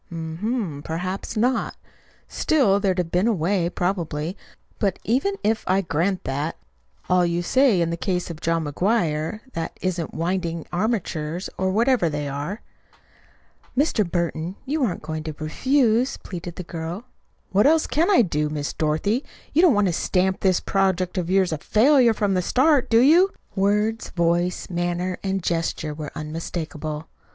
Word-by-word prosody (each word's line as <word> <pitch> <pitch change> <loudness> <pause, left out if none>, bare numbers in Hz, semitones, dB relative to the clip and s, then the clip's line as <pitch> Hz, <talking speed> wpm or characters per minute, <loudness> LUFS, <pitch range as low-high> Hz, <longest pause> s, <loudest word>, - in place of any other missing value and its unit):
"Hm 160 -1 -6 0.4
m, - - -9
perhaps 185 +7 -4
not. 250 +4 +1 0.5
Still 220 -11 +2
there'd 195 -2 +1
have 175 -2 -1
been 180 +5 +2
a 235 - +3
way, 175 0 +1
probably. 175 -2 -2 0.4
But 195 -3 +1
even 275 - +1
if 220 +1 +1
I 190 +1 +3
grant 180 +2 -1
that 145 +4 -3 0.5
all 180 0 +4
you 170 0 0
say 255 -3 +3
in 165 0 0
the 170 - -2
case 180 0 -2
of 165 0 -10
John 165 -1 0
McGuire 165 +2 0
that 165 -1 -4
isn't 175 -3 -3
winding 170 -1 -2
armatures, 175 -5 -2
or 190 0 0
whatever 230 -2 +2
they 145 -1 -3
are." 145 +10 -4 1.2
"Mr. 280 -6 +3
Burton, 170 0 -2
you 290 +2 0
aren't 185 -11 -1
going 155 0 -4
to 155 -1 -6
refuse," 245 - +1
pleaded 175 -2 -7
the 180 - -6
girl. 170 +6 -6 0.5
"What 205 +7 +4
else 320 +1 +4
can 330 +5 +1
I 375 -12 +6
do? 150 -5 -1
Miss 150 -1 -3
Dorothy, 160 - 0 0.3
you 315 - +5
don't 345 - +6
want 205 0 +3
to 180 - +1
stamp 185 +2 +1
this 185 -2 +2
project 190 -2 0
of 175 -1 -3
yours 190 -2 +3
a 155 - -3
FAILURE 240 - +4
from 205 -2 +1
the 185 - +2
start, 265 - +3
do 230 0 +5
you?" 335 +9 +6 0.3
Words, 210 +3 +1
voice, 175 +1 0
manner, 175 +1 -2
and 195 -1 -1
gesture 165 -2 -1
were 150 -1 -6
unmistakable. 155 0 -5
180 Hz, 160 wpm, -23 LUFS, 165-215 Hz, 1.2 s, I